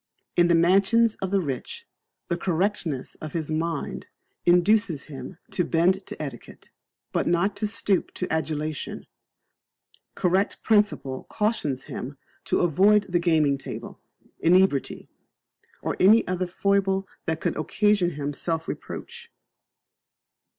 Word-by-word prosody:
In 175 0 +5
the 170 - +4
mansions 195 +7 +4
of 190 - -1
the 200 +1 +2
rich, 140 -8 -5 0.4
the 170 - 0
correctness 170 -5 -1
of 155 -2 -6
his 160 -2 -3
mind 160 -1 -3 0.4
induces 180 -2 +3
him 150 +1 -9
to 180 - +1
bend 180 +4 +1
to - - -8
etiquette, 135 -6 -8 0.4
but - - 0
not 175 +4 +2
to 215 - -1
stoop 205 -3 0
to 180 - -2
adulation; 155 -1 -3 1.1
correct 190 +3 0
principle 205 -11 +1
cautions 210 - -1
him 135 +3 -7 0.3
to - - +1
avoid 200 +5 +4
the 175 - +3
gaming 155 -5 +2
table, - - -8 0.4
inebriety, 175 -4 +2 0.8
or - - -1
any 215 +5 +6
other 185 0 -1
foible 195 +1 +1 0.2
that 160 0 -1
could - - -1
occasion 190 0 +1
him 145 0 -3
self 165 +2 -3
reproach. 470 0 -7
175 Hz, 125 wpm, -25 LUFS, 155-200 Hz, 1.1 s, any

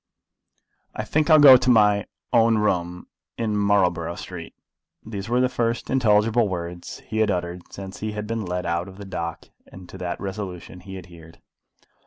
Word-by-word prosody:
"I 110 - -3
think 150 +7 0
I'll 155 - +8
go 140 -4 +10
to 130 0 -1
my 105 -4 +4 0.3
own 115 -1 +4
room 90 -4 -1 0.3
in 110 -2 -1
Marlborough 90 -5 +1
Street." 90 -2 -9 0.5
These 100 -1 -6
were 120 +1 +2
the 130 - +3
first 120 -2 -2
intelligible 115 -2 +3
words 85 -1 -6
he 110 - -3
had 110 - +3
uttered 90 -1 -4
since 95 -1 -8
he 110 0 -4
had 105 0 -4
been 115 0 -3
led 90 -1 -3
out 85 +1 -1
of 95 0 -12
the 100 - -9
dock, 85 -3 -5 0.2
and 95 -1 -13
to 95 - -10
that 90 -1 -4
resolution 95 -3 -6
he 95 +1 -9
adhered. 85 -3 -13
100 Hz, 175 wpm, -23 LUFS, 90-110 Hz, 0.5 s, go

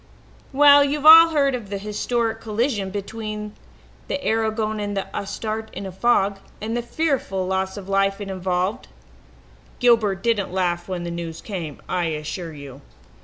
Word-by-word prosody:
"Well, 285 +1 +7
you've 285 +1 -2
all 325 +1 +10
heard 280 -4 +2
of 235 -6 -5
the 200 - -3
historic 225 +2 -2
collision 215 -2 -1
between 210 +1 -6 0.5
the - - -2
Aragon 220 -1 0
and 205 -1 -3
the 195 - -1
Astarte 220 +2 -4
in 200 - -6
a 190 - -6
fog, 200 -1 +1 0.2
and 225 +2 -3
the 240 - 0
fearful 240 - -1
loss 190 +1 -2
of 195 -2 -8
life 195 0 +1
it 205 - -6
involved. 185 +2 -2 0.9
Gilbert 220 -6 +2
didn't 225 -6 0
laugh 175 -2 -1
when 180 -2 -4
the 170 - -4
news 170 -1 -6
came, 170 -9 -7
I 180 -1 -1
assure 160 +2 -4
you. 140 -2 -11
205 Hz, 160 wpm, -22 LUFS, 190-230 Hz, 0.9 s, all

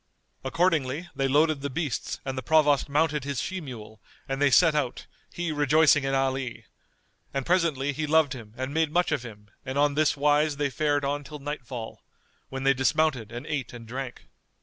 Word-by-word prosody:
Accordingly 160 +1 0
they 135 - +1
loaded 150 +1 +3
the 140 - -3
beasts 140 -2 -3
and 135 -1 -3
the 130 - -3
Provost 150 +1 +3
mounted 150 0 +1
his 140 -2 -3
she 185 -1 -3
mule 110 -6 -10 0.3
and 135 +1 -3
they 145 - +5
set 165 +4 +5
out 145 -5 -2 0.3
he 170 -1 -3
rejoicing 150 0 +4
in 135 0 0
Ali; 135 -2 -1 0.7
and 135 -1 -1
presently 155 -6 +1
he 155 +2 -3
loved 155 -2 +3
him 115 -4 -11
and 130 +2 -4
made 160 -1 +1
much 175 +1 +1
of 150 -5 0
him 105 -3 -12
and 130 0 -4
on 145 0 +3
this 150 0 +2
wise 145 +1 +2
they 145 -1 0
fared 145 0 0
on 145 +1 -1
till 150 +1 -8
nightfall, 130 -5 -6 0.5
when 135 0 -5
they 135 0 +5
dismounted 130 -3 +1
and 120 +4 -7
ate 135 -7 -3
and 115 -2 -10
drank. 130 +1 -6
140 Hz, 190 wpm, -27 LUFS, 130-150 Hz, 0.7 s, they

